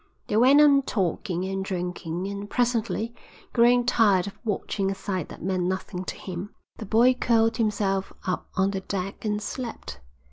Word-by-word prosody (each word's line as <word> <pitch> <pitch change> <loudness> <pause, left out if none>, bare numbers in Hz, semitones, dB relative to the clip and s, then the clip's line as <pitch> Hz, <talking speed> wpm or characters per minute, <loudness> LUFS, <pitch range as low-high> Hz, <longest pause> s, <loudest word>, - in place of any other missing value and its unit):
They - - -2
went 260 +6 +6
on 285 -2 +6
talking 185 - -1
and 195 0 -2
drinking, 180 -2 -3
and 200 +1 -5
presently, 235 -1 0 0.4
growing 245 0 +5
tired 210 -7 +4
of 200 - -8
watching 200 -2 -1
a 195 - -2
sight 190 -4 -3
that - - -10
meant 185 0 0
nothing 185 0 -3
to - - -4
him, 185 +2 -7 0.2
the 215 - -7
boy 235 +5 +5
curled 230 -2 +2
himself 205 -4 0
up 185 - -2
on 190 +1 +2
the 195 -1 -3
deck 195 0 -4
and 210 -1 0
slept. 230 +2 -6
200 Hz, 170 wpm, -26 LUFS, 190-230 Hz, 0.4 s, went